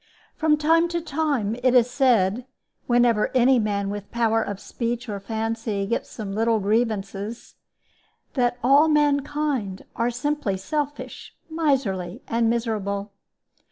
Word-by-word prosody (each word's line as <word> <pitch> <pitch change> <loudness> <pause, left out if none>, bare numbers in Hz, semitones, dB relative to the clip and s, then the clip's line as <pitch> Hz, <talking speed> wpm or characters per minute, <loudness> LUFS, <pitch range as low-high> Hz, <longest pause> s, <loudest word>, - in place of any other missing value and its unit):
From 310 -1 +2
time 325 +3 +3
to 345 0 -2
time 285 -9 -1
it 255 0 +3
is 245 -1 +6
said 245 -3 +2 0.4
(whenever 240 -3 +3
any 255 +1 +5
man 200 -2 -1
with 205 -1 -6
power 225 -1 +1
of 205 -3 -4
speech 235 +2 -4
or 205 -2 -4
fancy 220 -1 -2
gets 235 - -2
some 205 -4 -6
little 225 +1 +2
grievances) 210 0 -2 0.8
that 245 -2 +1
all 280 +5 +6
mankind 290 -8 0
are 235 +1 +1
simply 245 -4 -2
selfish, 290 +8 -5 0.2
miserly, 255 - -1
and 230 0 +1
miserable. 210 -4 -2
235 Hz, 125 wpm, -24 LUFS, 205-275 Hz, 0.8 s, is